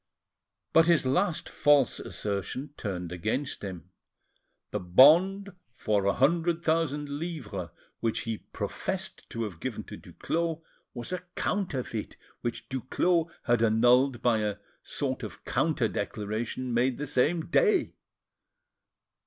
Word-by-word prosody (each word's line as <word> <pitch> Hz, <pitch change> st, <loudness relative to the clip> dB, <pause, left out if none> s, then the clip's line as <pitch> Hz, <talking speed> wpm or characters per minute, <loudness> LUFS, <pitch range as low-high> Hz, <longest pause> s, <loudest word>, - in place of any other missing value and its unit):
But 165 Hz, 0 st, +6 dB
his 170 Hz, -5 st, +4 dB
last 175 Hz, +6 st, +1 dB
false 145 Hz, -3 st, +3 dB
assertion 105 Hz, +8 st, -3 dB
turned 90 Hz, -5 st, -4 dB
against 110 Hz, +11 st, -2 dB
him: 90 Hz, -2 st, -7 dB, 0.8 s
the -, -, -1 dB
bond 175 Hz, -, +5 dB, 0.2 s
for 105 Hz, -4 st, 0 dB
a 100 Hz, -, +3 dB
hundred 165 Hz, +5 st, +2 dB
thousand 155 Hz, -3 st, +1 dB
livres 140 Hz, -, -5 dB, 0.3 s
which 115 Hz, -1 st, 0 dB
he 115 Hz, -2 st, -3 dB
professed -, -, -5 dB
to 115 Hz, -, -3 dB
have 95 Hz, -7 st, -6 dB
given -, -, -4 dB
to -, -, -9 dB
Duclos 165 Hz, -1 st, -3 dB, 0.3 s
was 120 Hz, +9 st, -5 dB
a 180 Hz, -, -1 dB, 0.2 s
counterfeit 135 Hz, -, -2 dB, 0.2 s
which 120 Hz, -1 st, -4 dB
Duclos 165 Hz, +6 st, +1 dB
had 120 Hz, -1 st, +2 dB
annulled 120 Hz, +3 st, +4 dB
by 120 Hz, -3 st, +3 dB
a 105 Hz, -1 st, -1 dB, 0.3 s
sort -, -, -2 dB
of -, -, -8 dB
counter -, -, +1 dB
declaration 110 Hz, +4 st, -3 dB
made 125 Hz, +2 st, +2 dB
the 145 Hz, -, -3 dB
same 150 Hz, +4 st, +1 dB
day. 425 Hz, -6 st, +3 dB
130 Hz, 125 wpm, -28 LUFS, 110-165 Hz, 0.8 s, But